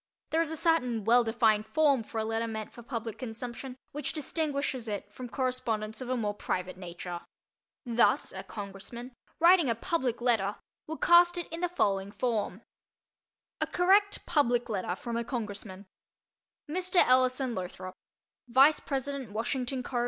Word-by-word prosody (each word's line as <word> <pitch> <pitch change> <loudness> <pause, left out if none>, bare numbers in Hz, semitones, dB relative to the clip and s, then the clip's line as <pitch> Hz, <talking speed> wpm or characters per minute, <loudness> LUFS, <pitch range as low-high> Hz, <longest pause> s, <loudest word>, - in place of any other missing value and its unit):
There 325 - +3
is 330 - -1
a 320 - -1
certain 250 -10 +2
well 240 +2 +6
defined 225 -2 +2
form 290 -4 +3
for 225 - -8
a 220 - 0
letter 225 +1 -1
meant 220 -1 -5
for 240 - -10
public 230 -3 -5
consumption 250 +1 -6
which 275 -1 -3
distinguishes 285 -5 -2
it 205 -1 -5
from 250 +2 -7
correspondence 230 -4 -2
of 255 - -5
a 255 - 0
more 210 -3 -1
private 185 -2 -3
nature. 175 -1 -6 0.7
Thus 235 -1 +2
a - - -5
Congressman, 210 +4 -8 0.3
writing 340 -3 +6
a 230 - +2
"public 255 -1 -1
letter," 225 -5 +1 0.3
would 320 +1 -6
cast 345 +1 +6
it 345 - -3
in 330 - -4
the 355 - +1
following 200 - 0
form: 225 -3 -2 1.0
A - - +1
Correct 400 +3 +3
"Public 245 -7 +2
Letter" 185 -4 -2
from 235 +3 -4
a 235 - -1
Congressman 205 -5 -5 0.8
Mr. 365 +4 -2
Ellison 255 0 +3
Lothrop, 185 -1 -6 0.5
Vice 270 +5 +6
Pres. 270 -2 -3 0.2
Washington 250 +4 -2
Co.. 245 0 -2
240 Hz, 155 wpm, -30 LUFS, 215-280 Hz, 1.0 s, well